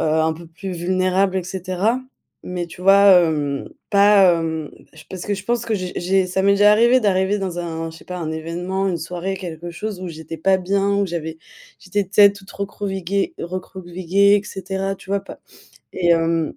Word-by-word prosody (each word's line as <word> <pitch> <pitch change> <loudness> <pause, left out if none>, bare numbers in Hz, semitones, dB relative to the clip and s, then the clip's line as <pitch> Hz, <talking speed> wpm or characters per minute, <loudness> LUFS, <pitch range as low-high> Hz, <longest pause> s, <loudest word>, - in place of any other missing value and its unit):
un 160 +1 +2
peu 165 +2 -11
plus 175 +4 -8
vulnérable, 185 +2 +1
et 185 - 0
cetera. 190 +6 -1 0.4
Mais 180 -1 -4
tu 175 - -13
vois, 195 +1 +7
hem, 145 -3 -2 0.2
pas 200 -3 +6
hem, 160 -2 -3 0.2
j 160 - -14
parce 185 -2 -6
que 205 - 0
je 190 - -8
pense 235 +2 -1
que 225 - 0
j'ai 185 -2 -4
j'ai, 190 +1 +1
ça 185 +1 -1
m'est 200 - +4
déjà 205 +1 +5
arrivé 235 +4 +5
d'arriver 195 -1 +1
dans 185 -3 -4
un 165 -1 -4
je 165 - -13
sais - - -17
pas, 180 - -6
un 160 -2 -4
événement, 175 +5 -3
une 180 - -1
soirée, 180 +4 -4
quelque 175 -2 -7
chose 200 +2 -5
où 185 - -5
j'étais 160 0 -8
pas 190 +4 +3
bien, 195 +2 0
où 200 0 +1
j'avais 160 -2 -5 0.4
j'étais 200 +2 -1
peut-être 200 +1 +5
toute 195 0 -15
recroquevillée- 200 - -3
recroquevillée, 185 +2 0
et - - -20
cetera, 195 0 -4
tu 190 0 -14
vois 200 - +1
pas - - -12 0.5
Et 175 -2 0
hem, 165 -1 +2
185 Hz, 195 wpm, -20 LUFS, 170-200 Hz, 0.5 s, vois